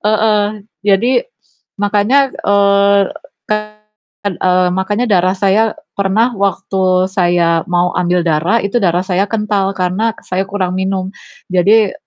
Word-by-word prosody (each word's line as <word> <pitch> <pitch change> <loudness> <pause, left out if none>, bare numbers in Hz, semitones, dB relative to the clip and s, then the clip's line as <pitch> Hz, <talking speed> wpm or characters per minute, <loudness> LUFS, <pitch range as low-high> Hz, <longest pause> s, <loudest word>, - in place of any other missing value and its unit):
Heeh, 210 -1 0 0.2
jadi 230 - +2 0.5
makanya, 210 +7 +2
eee, 200 0 +3 1.2
kan, 200 - -1
eee, 180 0 +2
makanya 205 +5 -1
darah 185 -1 +2
saya 205 +3 +1 0.2
pernah 200 +5 +1
waktu 190 -2 0
saya 175 -3 +1
mau 175 0 +1
ambil 175 0 0
darah 165 +7 +1
itu 200 +4 0
darah 180 -1 +1
saya 190 +1 0
kental 205 -3 -1
karena 190 +5 -1
saya 190 +1 -3
kurang 190 -3 -2
minum. 190 0 -2 0.4
Jadi 205 +3 +3
195 Hz, 120 wpm, -15 LUFS, 185-210 Hz, 1.2 s, eee